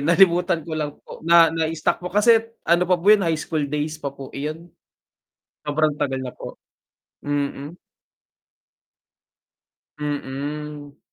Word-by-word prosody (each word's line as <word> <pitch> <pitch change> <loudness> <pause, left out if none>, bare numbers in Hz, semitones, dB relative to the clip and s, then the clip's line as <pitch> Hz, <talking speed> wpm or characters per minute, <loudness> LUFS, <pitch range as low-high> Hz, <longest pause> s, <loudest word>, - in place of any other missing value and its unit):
nalimutan 170 +1 +3
ko 165 - -8
lang 150 -2 -3
po, - - -11
na 165 0 +6
na 160 -1 0
stock 155 - 0
po, 180 - -5
kasi 220 +4 +5 0.2
ano 175 +2 +3
pa 180 - +4
po 170 - -12
yun 210 - +5
high 165 -3 +1
school 155 0 -3
days 150 +2 -3
pa 140 - -2
po 135 -1 -10
iyon. 155 +4 -5 1.0
Sobrang 150 0 +1
tagal 130 -1 -1
na 125 - -5
po, - - -9 0.7
mm. 145 +1 -3 2.2
Mm. 145 0 -5
155 Hz, 135 wpm, -22 LUFS, 145-170 Hz, 2.2 s, na